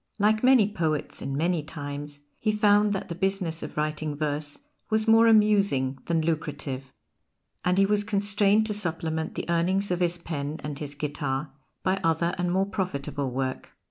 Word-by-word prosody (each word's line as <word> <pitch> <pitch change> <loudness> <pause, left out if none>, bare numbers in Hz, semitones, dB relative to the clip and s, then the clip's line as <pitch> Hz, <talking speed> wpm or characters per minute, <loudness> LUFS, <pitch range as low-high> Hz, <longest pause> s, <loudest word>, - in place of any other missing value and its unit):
Like 215 +2 +2
many 250 -5 +6
poets 160 -8 -2
in 135 0 -3
many 170 +1 +1
times, 145 -1 -7 0.2
he 215 - +1
found 210 0 +4
that 195 - -2
the - - -4
business 185 -2 -1
of 150 - -7
writing 150 0 -1
verse 145 0 -3 0.3
was 220 0 +1
more 225 +1 +6
amusing 200 -12 +3
than 165 -2 +1
lucrative; 140 -5 -3 0.7
and 180 +1 +2
he 195 - +5
was 205 +1 +1
constrained 205 0 +2
to 215 - -1
supplement 165 -5 -3
the - - -4
earnings 180 +4 +1
of 180 - 0
his 175 -1 +1
pen 155 -3 -4
and 150 -1 -5
his 145 -1 -6
guitar 145 -1 -3 0.3
by 190 +1 +1
other 165 +1 +1
and 180 0 0
more 190 +2 +2
profitable 160 -8 -3
work. 130 +1 -3
170 Hz, 170 wpm, -27 LUFS, 150-200 Hz, 0.7 s, many